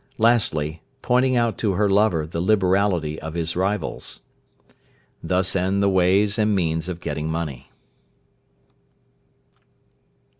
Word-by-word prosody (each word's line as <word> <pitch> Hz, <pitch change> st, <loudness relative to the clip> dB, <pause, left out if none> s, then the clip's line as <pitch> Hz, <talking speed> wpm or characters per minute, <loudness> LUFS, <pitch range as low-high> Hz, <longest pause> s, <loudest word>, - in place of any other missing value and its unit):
Lastly, 85 Hz, -, +1 dB, 0.2 s
pointing 130 Hz, +1 st, +2 dB
out 115 Hz, -2 st, 0 dB
to 105 Hz, -4 st, 0 dB
her 105 Hz, +3 st, +1 dB
lover 100 Hz, -5 st, +2 dB
the 85 Hz, +1 st, -4 dB
liberality 95 Hz, -5 st, +1 dB
of 80 Hz, +1 st, -7 dB
his 85 Hz, -1 st, -2 dB
rivals. 95 Hz, 0 st, -3 dB, 1.0 s
Thus 95 Hz, +1 st, 0 dB
end 95 Hz, +2 st, +1 dB
the 100 Hz, -, +3 dB
ways 95 Hz, +3 st, +2 dB
and 105 Hz, -1 st, +2 dB
means 80 Hz, -2 st, -1 dB
of 90 Hz, -2 st, -5 dB
getting 75 Hz, +1 st, -3 dB
money. 75 Hz, -6 st, -5 dB
95 Hz, 115 wpm, -22 LUFS, 80-105 Hz, 1.0 s, the